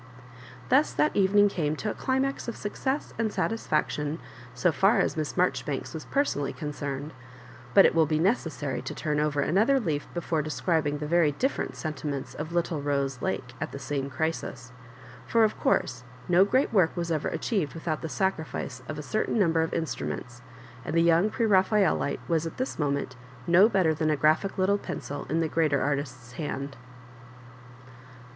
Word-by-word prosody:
Thus 280 +4 +4
that 305 - +1
evening 205 +1 +5
came 155 -6 -1
to 210 +6 -3
a - - -4
climax 265 0 -1
of 235 - -3
snc 205 +5 -6
oesa 285 - -4
and 225 -2 +1
satisfaction 155 -9 -1 0.4
so 160 +6 +2
&r 195 +3 +5
as - - +1
Miss 155 -2 -2
Maijoribanks 150 -6 -1
was 160 -2 -6
personally 145 - 0
concerned; 145 -1 -5 0.6
but 195 - +9
it - - +4
will 160 -2 +4
be 155 0 +1
neces 190 0 +2
sary 145 -4 -4
to 155 - -6
turn 150 +2 -1
over 150 -1 +1
another 220 - +3
leaf 155 - -2
before 165 -2 0
describing 155 -1 0
the 150 - -4
very 160 -1 +3
different 265 - -1
sentiments 145 -3 -4
of 155 +2 -6
little 170 -3 -1
Bose 140 -2 -1
Lake 120 -1 -3
at 155 - -3
the - - -5
same 140 0 -3
crisis; 130 -3 -3 0.6
for, 230 -1 +4
of 215 - +1
course, 125 -1 +1 0.2
no 180 +2 +5
great 255 +4 +1
work 180 -6 +3
was 170 -1 -2
ever 155 -2 0
aobieved 195 - -2
without 160 -1 -3
the 160 - -4
sacrifice 190 -4 -2
of 155 - -4
a 150 - -5
cer 215 +9 0
tain - - 0
number 165 -5 +3
of 160 - -1
instruments, 125 -6 -4 0.4
and - - -4
the 165 - +4
young 170 +4 +4
Pre 230 +1 0
raphaelite 195 -5 +2
was 165 -1 +1
at - - -8
this 255 -6 -3
moment 140 -3 -1 0.3
no 180 +7 +6
better 185 -7 +3
than 155 0 0
a 150 - +2
graphic 155 +7 +2
little 195 +2 +2
pencil 145 -6 -6
in 165 +2 +1
the 165 - +1
greater 155 -3 +1
artist's 130 -4 -3
hand. 140 0 -4
160 Hz, 180 wpm, -27 LUFS, 145-195 Hz, 0.6 s, but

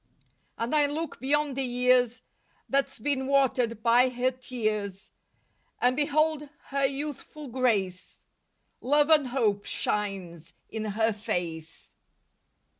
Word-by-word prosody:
And 230 +4 -2
I 295 -1 +4
look 310 +3 -4
beyond 290 +1 +1
the 270 - -1
years 250 -1 +2 0.4
That's 275 0 0
been 265 +2 -1
watered 250 -5 +1
by 245 +2 +5
her 250 +1 0
tears 215 -6 -3 0.7
And 250 +1 +3
behold 300 0 +1 0.2
her 275 0 +2
youthful 290 +1 -6
grace, 220 -8 -1 0.6
Love 290 +4 +3
and 295 -4 +5
hope 220 -6 0
shines 190 -6 -3 0.2
in 220 -1 -3
her 220 +2 +1
face. 175 -7 -5
250 Hz, 115 wpm, -28 LUFS, 215-280 Hz, 0.7 s, by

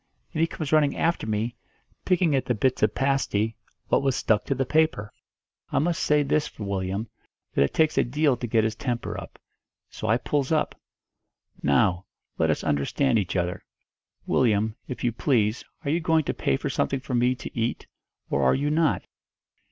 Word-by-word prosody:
And 155 - -1
he 165 - +4
comes 155 -3 -5
running 150 -2 +3
after 165 -9 0
me, 110 +3 -1 0.5
picking 180 -4 +3
at 135 - 0
the 125 - 0
bits 130 +4 +1
of 105 -1 +2
pasty 125 -5 0 0.3
what - - +3
was 135 -2 +1
stuck 105 -2 +1
to 135 - 0
the 135 +1 0
paper; 155 -8 +1 0.6
I - - 0
must 170 +3 +1
say 150 -1 +3
this 145 +2 +1
for 105 - -9
Willyum, 100 +2 -2 0.5
that - - +2
it 70 - +3
takes 160 -1 +2
a - - +4
deal 145 +2 +2
to 120 - -4
get 110 -1 +2
his 110 0 0
temper 120 +1 -3
up. - - -12 0.5
So 110 - -5
I 110 +1 +4
pulls 140 +2 -1
up. 155 -1 +1 0.9
'Now, 85 +6 +2 0.3
let - - +3
us - - 0
understand 115 - +1
each 90 -2 -3
other. 90 -1 -1 0.6
Willyum, 110 -3 +2
if 125 - -6
you 120 - +2
please, 115 -2 +1 0.2
are 140 - +1
you 165 - +2
going 160 -1 +2
to - - -2
pay 65 - 0
for - - -3
something 135 - 0
for 130 0 -7
me 125 +1 +3
to 115 - -9
eat, 115 0 -2 0.4
or 70 - 0
are 65 -1 +4
you 145 +2 0
not?' 155 -1 +1
125 Hz, 190 wpm, -26 LUFS, 105-145 Hz, 0.9 s, he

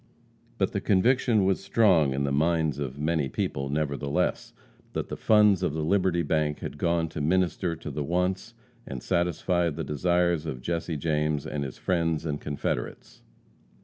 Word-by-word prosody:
But - - +1
the - - -2
conviction 110 +1 +3
was 95 -1 +1
strong 90 -11 +4
in 70 +1 -1
the 70 - -1
minds 80 -1 +1
of 70 -1 -4
many 75 -2 0
people, 70 +2 -2
nevertheless, 70 -1 -1 0.4
that - - -3
the - - -4
funds 105 -3 +4
of 90 -5 0
the 80 - -2
Liberty 90 0 +2
bank 75 -1 0
had - - -6
gone 85 -1 +1
to 75 - -5
minister 90 +1 +1
to 80 -2 -7
the 75 +2 -3
wants 90 +4 -1 0.3
and 65 -2 -6
satisfy 85 0 +1
the 80 +1 -4
desires 85 +1 +1
of 65 -5 -4
Jesse 85 0 -2
James 75 -1 0
and 75 -1 -3
his 65 -2 -6
friends 85 -3 0
and 75 -2 -3
confederates. 70 -4 -4
80 Hz, 165 wpm, -27 LUFS, 75-90 Hz, 0.4 s, strong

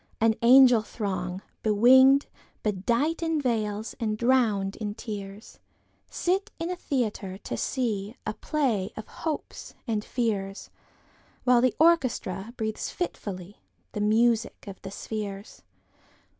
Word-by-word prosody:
An 225 0 +4
angel 250 -1 +7
throng, 190 -4 -4 0.2
bewinged, 260 +6 +6 0.4
bedightIn 285 - 0
veils, 220 -5 -1
and 215 -2 -1
drowned 220 -5 +2
in 210 -2 -4
tears, 205 -1 -8 0.5
Sit 375 +3 0
in 335 +2 -3
a - - -2
theatre, 215 - -2
to - - -5
seeA 220 -4 -2 0.3
play 245 - 0
of 220 - -6
hopes 315 -2 -5
and 220 -4 -1
fears, 205 -6 -2 0.7
While 250 -1 +5
the 255 -2 +2
orchestra 250 - +2
breathes 220 -1 -3
fitfullyThe 205 - -6
music 225 +2 +2
of 195 -2 -9
the 195 - -7
spheres. 205 0 -6
220 Hz, 110 wpm, -27 LUFS, 205-255 Hz, 0.7 s, angel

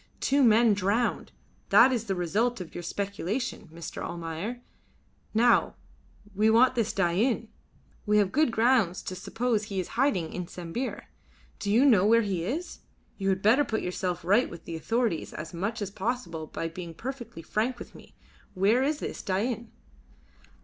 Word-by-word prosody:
Two 280 +1 +2
men 225 -1 +5
drowned 205 +5 0 0.4
that 260 - +7
is 230 -3 -1
the 195 -3 -1
result 210 +8 0
of 180 -3 -8
your - - -5
speculation, 200 +3 -3
Mr. 165 0 -7
Almayer. 170 +8 -5 0.7
Now 235 +2 +3 0.6
we 210 +3 +3
want 240 +4 +5
this 230 -3 0
Dain. 205 +6 +1 0.6
We 210 0 +4
have 200 -2 +3
good 305 +3 +3
grounds 225 -6 +2
to 185 - -5
suppose 220 +3 -1
he 200 -2 -3
is 180 - -3
hiding 230 - 0
in 180 -1 -4
Sambir. 180 +11 -5 0.6
Do 200 - -3
you 235 +7 +5
know 220 -9 +6
where 230 +2 +5
he 190 -5 -2
is? 300 - -4 0.4
You 195 0 0
had 190 0 0
better 235 +8 +5
put 220 -5 -2
yourself 180 -1 -3
right 205 +7 +3
with 170 - -11
the 165 - -5
authorities 225 +1 -1
as 160 +3 -7
much 205 +5 -2
as 200 - -5
possible 190 -7 -3
by 165 - -4
being 170 0 -8
perfectly 240 -5 -7
frank 235 +8 -1
with - - -10
me. - - -16 0.4
Where 205 +7 +3
is 290 +3 +1
this - - -5
Dain?" 225 +4 -2
210 Hz, 165 wpm, -28 LUFS, 180-240 Hz, 0.7 s, that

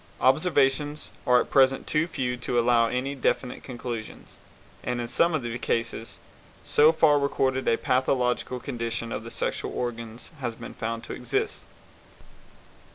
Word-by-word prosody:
Observations 145 +1 +2 0.2
are 125 0 +6
at - - -3
present 135 -1 +4
too 155 +2 +1
few 125 -6 -2
to 120 0 -1
allow 120 -1 +4
any 130 +4 -2
definite 130 -2 -1
conclusions, 120 -3 -7 0.4
and 125 0 -2
in 120 - -3
some 170 +7 +2
of 150 - -2
the 120 +1 -4
cases 115 -1 -2 0.5
so 150 +2 +5
far 150 -2 +4
recorded 135 -2 0
a 115 - +4
pathological 125 -1 +1
condition 115 -1 -4
of 110 - -4
the 115 - -7
sexual - - -3
organs 115 -1 -5
has 120 -4 -3
been 115 - -9
found 115 0 -4
to - - -6
exist. - - -2
125 Hz, 150 wpm, -26 LUFS, 115-135 Hz, 0.5 s, are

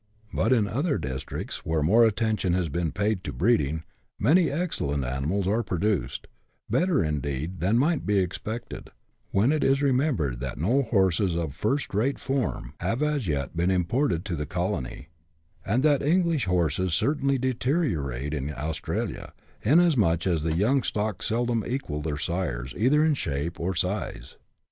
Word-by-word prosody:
But - - +1
in 115 -5 +3
other 140 - 0
districts, 65 0 -5
where 80 -1 0
more 110 +9 +5
attention 110 -4 0
lias 90 -2 0
been 80 +2 -1
paid 105 -1 -1
to 75 - -4
breeding, 80 - +1 0.3
many 160 - +4
excellent 135 - -1
animals 70 +10 -1
are 110 +4 +2
produced 95 - -1 0.2
— - - -43
better, 180 -5 +2
indeed, 75 +3 -3
than 100 +6 +2
might 150 +4 +2
be 105 -1 +1
expected, 105 +5 -3 0.4
when 110 +8 +3
it 155 -1 +1
is 135 +1 +3
remembered 125 - +1
that 65 -1 -4
no 115 - +2
horses 95 -6 +2
of 80 -4 -2
first 120 - -1
rate 120 +8 +1
form 130 - -2
have 120 +6 -1
as 150 -7 0
yet 70 -5 -2
been 85 +2 +1
imported 95 - +1
to 85 - -2
the 75 -1 -4
colony, 85 -4 -3 0.5
and 115 +7 +1
that 145 -3 +4
English 165 -1 +2
horses 90 -1 +1
certainly 140 - +1
deteriorate 120 - -1
in 75 -1 -2
Australia, 75 +3 -4 0.3
inasmuch 120 - +3
as 85 -4 +1
the 80 0 0
young 125 +8 +3
stock 105 -2 -2
seldom 115 0 0
equal 120 - -3
their 75 -1 -3
sires 75 -7 -3
either 150 +7 +3
in 160 - +3
shape 80 - -3
or 90 +2 -1
size. 85 -8 -3
95 Hz, 160 wpm, -26 LUFS, 80-130 Hz, 0.5 s, more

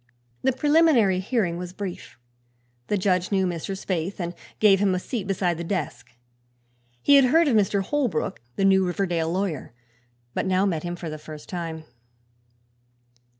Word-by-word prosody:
The 265 - +2
preliminary 280 - +4
hearing 190 -4 -1
was 180 0 -6
brief. 190 -8 -7 0.7
The 210 - +1
judge 185 -1 +1
knew 190 -1 +2
Mr. 175 +1 -3
Spaythe 185 0 -3
and 175 -1 -3 0.3
gave 200 -3 +5
him 195 -2 +2
a - - -1
seat 200 0 -4
beside 180 -3 0
his 170 - -5
desk. 135 - -4 0.9
He 285 - +7
had 275 - +6
heard 320 +6 +4
of 255 - +3
Mr. 200 -1 +2
Holbrook, 235 - -1
the 195 - +1
new 190 -1 +5
Riverdale 175 -3 -1
lawyer, 180 -9 -3 0.6
but - - -1
now 190 +1 +2
met 170 -6 0
him 175 +1 -4
for 170 -2 -6
the 155 - -6
first 155 0 -10
time. 165 -3 -5
185 Hz, 160 wpm, -25 LUFS, 170-205 Hz, 0.9 s, He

